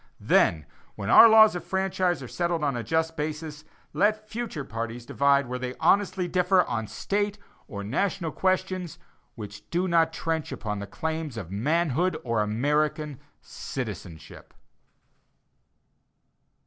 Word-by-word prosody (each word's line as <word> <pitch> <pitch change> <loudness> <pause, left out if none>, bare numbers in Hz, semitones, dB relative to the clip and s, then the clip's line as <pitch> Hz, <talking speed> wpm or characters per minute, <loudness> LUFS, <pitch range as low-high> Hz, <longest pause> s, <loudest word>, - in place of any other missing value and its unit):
Then, 80 -3 +2 0.3
when 100 - -3
our 230 - +10
laws 220 -2 +7
of 175 - -4
franchise 185 -3 -1
are - - -7
settled 170 +2 -1
on 140 -3 0
a 120 - -2
just 160 +4 -1
basis, 155 0 -5 0.3
let 215 +1 +1
future 220 -10 -5
parties 115 0 -5
divide 140 +1 +2
where 125 +1 -5
they 125 0 -4
honestly 185 +2 +2
differ 180 +1 +3
on 115 -5 -3
State 205 - -2 0.3
or 100 -7 -6
national 165 - -1
questions 185 -2 -1 0.4
which 105 -1 -10
do 180 +2 0
not 165 -2 +3
trench 165 -1 -3
upon 105 -2 -4
the 100 - -6
claims 160 +1 -4
of 95 -6 -7
manhood 160 - 0
or 115 -3 0
American 145 +6 0 0.2
citizenship. 80 -3 -8
155 Hz, 135 wpm, -26 LUFS, 120-180 Hz, 0.4 s, our